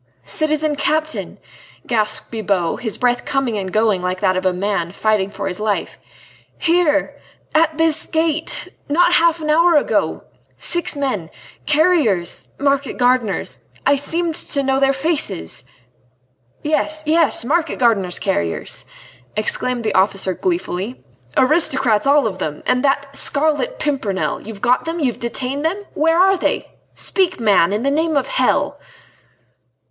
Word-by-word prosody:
"Citizen 310 Hz, -1 st, 0 dB
Captain," 310 Hz, +2 st, -1 dB, 0.5 s
gasped 215 Hz, -2 st, -1 dB
Bibot, 200 Hz, -6 st, -1 dB
his 220 Hz, -4 st, -3 dB
breath 245 Hz, -1 st, +1 dB
coming 270 Hz, -5 st, -1 dB
and 190 Hz, -2 st, -3 dB
going 215 Hz, -3 st, +2 dB
like 180 Hz, +1 st, -2 dB
that 185 Hz, -, +2 dB
of 185 Hz, 0 st, 0 dB
a -, -, +3 dB
man 180 Hz, -2 st, -2 dB
fighting 210 Hz, -1 st, 0 dB
for 200 Hz, -1 st, -5 dB
his 185 Hz, +1 st, -3 dB
life. 210 Hz, -1 st, -2 dB, 0.6 s
"Here!... 330 Hz, -3 st, +1 dB, 0.3 s
at 315 Hz, 0 st, +2 dB
this 320 Hz, -1 st, +1 dB
gate!... 320 Hz, 0 st, -1 dB, 0.2 s
not 350 Hz, +4 st, +3 dB
half 335 Hz, -1 st, +3 dB
an 305 Hz, 0 st, 0 dB
hour 335 Hz, +2 st, +4 dB
ago... 295 Hz, -, +1 dB, 0.3 s
six 345 Hz, -2 st, +2 dB
men... 255 Hz, -, -2 dB, 0.4 s
carriers... 295 Hz, -, +2 dB
market 280 Hz, 0 st, 0 dB
gardeners... 245 Hz, -4 st, 0 dB, 0.3 s
I 285 Hz, -, +5 dB
seemed 325 Hz, +4 st, -1 dB
to 280 Hz, -2 st, -2 dB
know 265 Hz, 0 st, +1 dB
their 270 Hz, 0 st, +4 dB
faces...." 270 Hz, -, 0 dB, 1.0 s
"Yes! 310 Hz, 0 st, 0 dB
yes! 320 Hz, -6 st, +2 dB
market 320 Hz, +3 st, 0 dB
gardener's 200 Hz, -8 st, +1 dB
carriers," 85 Hz, -, -2 dB, 0.5 s
exclaimed 235 Hz, +3 st, -1 dB
the 215 Hz, -2 st, -1 dB
officer 190 Hz, 0 st, +2 dB
gleefully, 250 Hz, -, -3 dB, 0.3 s
"aristocrats 265 Hz, -5 st, +2 dB
all 285 Hz, -1 st, +4 dB
of 190 Hz, -4 st, -3 dB
them... 150 Hz, -4 st, -4 dB
and 250 Hz, -, +1 dB
that 280 Hz, 0 st, +2 dB
d 280 Hz, -, -17 dB
d 275 Hz, -, -9 dB
Scarlet 310 Hz, -, 0 dB
Pimpernel. 260 Hz, -10 st, -2 dB
You've 215 Hz, -3 st, -8 dB
got 250 Hz, +1 st, +2 dB
them? 330 Hz, +1 st, -3 dB
You've 260 Hz, -6 st, -1 dB
detained 255 Hz, +4 st, -3 dB
them?... 375 Hz, +6 st, -1 dB
Where 325 Hz, +2 st, +2 dB
are 385 Hz, +1 st, +5 dB
they?... -, -, -2 dB, 0.2 s
Speak, 370 Hz, -5 st, 0 dB
man, 200 Hz, -6 st, +3 dB
in 210 Hz, +3 st, -1 dB
the 275 Hz, -, +1 dB
name 315 Hz, +1 st, +1 dB
of 275 Hz, -, +1 dB
hell!..." -, -, +1 dB
270 Hz, 145 wpm, -19 LUFS, 210-315 Hz, 1.0 s, I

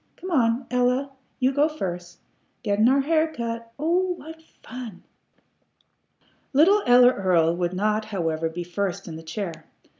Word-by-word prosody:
Come 370 Hz, -, -8 dB
on, 245 Hz, -4 st, +2 dB
Ella; 250 Hz, +2 st, +1 dB, 0.3 s
you 260 Hz, 0 st, +2 dB
go 290 Hz, +3 st, +2 dB
first. 180 Hz, -, -6 dB, 0.4 s
Gettin' 210 Hz, +3 st, +3 dB
our 275 Hz, +1 st, +3 dB
hair 315 Hz, +2 st, +1 dB
cut! 230 Hz, -4 st, -5 dB
Oh 355 Hz, +5 st, +1 dB
what 320 Hz, 0 st, -11 dB, 0.2 s
fun!" 240 Hz, -8 st, -9 dB, 1.5 s
Little 370 Hz, +9 st, +5 dB
Ella 245 Hz, +1 st, +7 dB
Earl 170 Hz, -5 st, +2 dB
would 175 Hz, 0 st, -1 dB
not, 215 Hz, +2 st, 0 dB
however, 165 Hz, -6 st, -2 dB
be 175 Hz, +2 st, -5 dB
first 180 Hz, +1 st, -3 dB
in 165 Hz, -, -7 dB
the 160 Hz, -, -8 dB
chair. 165 Hz, -1 st, -6 dB
230 Hz, 145 wpm, -24 LUFS, 180-280 Hz, 1.5 s, Ella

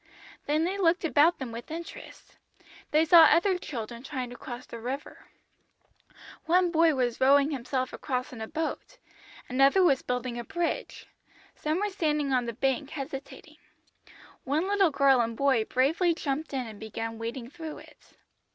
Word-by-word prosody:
"Then 305 Hz, +2 st, +2 dB
they 380 Hz, +4 st, -2 dB
looked 345 Hz, -1 st, +2 dB
about 320 Hz, +2 st, +4 dB
them 260 Hz, -4 st, -6 dB
with 230 Hz, +1 st, -8 dB
interest. 330 Hz, +2 st, -9 dB, 0.5 s
They 310 Hz, +2 st, +3 dB
saw 330 Hz, 0 st, +8 dB
other 360 Hz, +4 st, +3 dB
children 235 Hz, -6 st, -6 dB
trying 260 Hz, -3 st, -5 dB
to -, -, -8 dB
cross 245 Hz, 0 st, -8 dB
the 235 Hz, -, -9 dB
river; 260 Hz, +5 st, -6 dB, 1.2 s
one 355 Hz, +1 st, +3 dB
boy 325 Hz, -2 st, +4 dB
was 245 Hz, -2 st, -1 dB
rowing 280 Hz, +2 st, +5 dB
himself 255 Hz, -1 st, -3 dB
across 255 Hz, -1 st, -3 dB
in 230 Hz, -, -8 dB
a 220 Hz, -, -4 dB
boat, 320 Hz, -, -4 dB, 0.5 s
another 275 Hz, +8 st, +4 dB
was 280 Hz, -7 st, +3 dB
building 250 Hz, -1 st, -3 dB
a -, -, -4 dB
bridge, 345 Hz, +7 st, -3 dB, 0.5 s
some 310 Hz, +3 st, -2 dB
were 415 Hz, 0 st, -1 dB
standing 300 Hz, -6 st, 0 dB
on 250 Hz, -1 st, +2 dB
the 235 Hz, -, -4 dB
bank 270 Hz, +3 st, -1 dB
hesitating. 275 Hz, -2 st, -8 dB, 0.9 s
One 300 Hz, +7 st, 0 dB
little 400 Hz, -3 st, +3 dB
girl 275 Hz, -3 st, +4 dB
and 230 Hz, -1 st, -3 dB
boy 265 Hz, -5 st, +2 dB
bravely 325 Hz, +9 st, +2 dB
jumped 300 Hz, 0 st, -3 dB
in 265 Hz, -3 st, -2 dB
and 215 Hz, -2 st, -10 dB
began 225 Hz, +1 st, -5 dB
wading 235 Hz, +2 st, -6 dB
through 320 Hz, -2 st, -7 dB
it. -, -, -17 dB
275 Hz, 160 wpm, -28 LUFS, 250-325 Hz, 1.2 s, saw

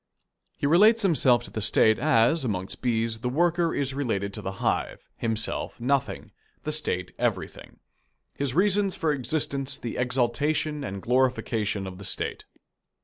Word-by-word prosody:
He -, -, -2 dB
relates 210 Hz, +9 st, +5 dB
himself 130 Hz, -, +4 dB
to -, -, -10 dB
the 110 Hz, -, -4 dB
State 110 Hz, +2 st, +4 dB
as, 145 Hz, +2 st, +3 dB
amongst 95 Hz, -6 st, -4 dB
bees, 115 Hz, -2 st, 0 dB
the 125 Hz, -, -2 dB
worker 170 Hz, +4 st, +1 dB
is 135 Hz, -1 st, -1 dB
related 100 Hz, -8 st, -2 dB
to -, -, -5 dB
the 95 Hz, -, -4 dB
hive; -, -, -2 dB
himself 115 Hz, +1 st, -2 dB
nothing, 130 Hz, +3 st, -1 dB, 0.3 s
the 155 Hz, -, -2 dB
State 90 Hz, -12 st, -2 dB
everything; -, -, -3 dB, 0.6 s
his 140 Hz, -2 st, -3 dB
reasons 200 Hz, +1 st, +2 dB
for 160 Hz, -2 st, 0 dB
existence 140 Hz, 0 st, -2 dB
the 120 Hz, -, -6 dB
exaltation 140 Hz, +5 st, 0 dB
and 100 Hz, -6 st, -6 dB
glorification 115 Hz, -5 st, 0 dB
of 95 Hz, 0 st, -8 dB
the -, -, -9 dB
State. -, -, -2 dB
130 Hz, 145 wpm, -26 LUFS, 115-155 Hz, 0.6 s, relates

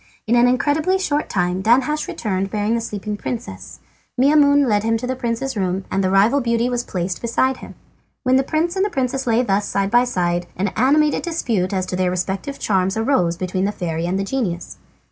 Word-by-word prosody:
In 225 Hz, -, 0 dB
an 240 Hz, +1 st, +5 dB
incredibly 300 Hz, +8 st, +1 dB
short 300 Hz, -6 st, -1 dB
time 180 Hz, 0 st, 0 dB
Danhasch 260 Hz, +8 st, +2 dB
returned, 195 Hz, -2 st, -2 dB
bearing 210 Hz, +1 st, -1 dB
the 235 Hz, -, 0 dB
sleeping 210 Hz, -2 st, -5 dB
princess. 95 Hz, -, -6 dB, 0.4 s
Maimoune 285 Hz, +1 st, +5 dB
led 210 Hz, -3 st, +2 dB
him 225 Hz, +1 st, +1 dB
to 240 Hz, -, -5 dB
the 260 Hz, +1 st, -2 dB
prince's 250 Hz, +2 st, -3 dB
room, 190 Hz, -1 st, -2 dB
and 195 Hz, -, 0 dB
the 185 Hz, -, +1 dB
rival 210 Hz, +9 st, +3 dB
beauty 235 Hz, 0 st, +1 dB
was 240 Hz, -1 st, -1 dB
placed 180 Hz, -4 st, -4 dB
beside 260 Hz, +3 st, +1 dB
him. -, -, -11 dB, 0.5 s
When 255 Hz, 0 st, +3 dB
the 265 Hz, -, +4 dB
prince 320 Hz, +5 st, -1 dB
and 390 Hz, +2 st, 0 dB
princess 265 Hz, -3 st, -2 dB
lay 235 Hz, +1 st, +3 dB
thus 205 Hz, -3 st, 0 dB
side 195 Hz, 0 st, -1 dB
by 240 Hz, +1 st, +4 dB
side, 175 Hz, -6 st, -1 dB
an 195 Hz, +2 st, 0 dB
animated 290 Hz, +8 st, +2 dB
dispute 230 Hz, -, -1 dB
as 190 Hz, -2 st, -1 dB
to 185 Hz, -, -4 dB
their 185 Hz, 0 st, +1 dB
respective 190 Hz, +9 st, -3 dB
charms 190 Hz, 0 st, 0 dB
arose 220 Hz, -8 st, +1 dB
between 185 Hz, +1 st, -2 dB
the 205 Hz, -, 0 dB
fairy 170 Hz, -4 st, -3 dB
and 185 Hz, +2 st, -1 dB
the 195 Hz, -, -1 dB
genius. 195 Hz, -7 st, -3 dB
225 Hz, 205 wpm, -20 LUFS, 185-260 Hz, 0.5 s, an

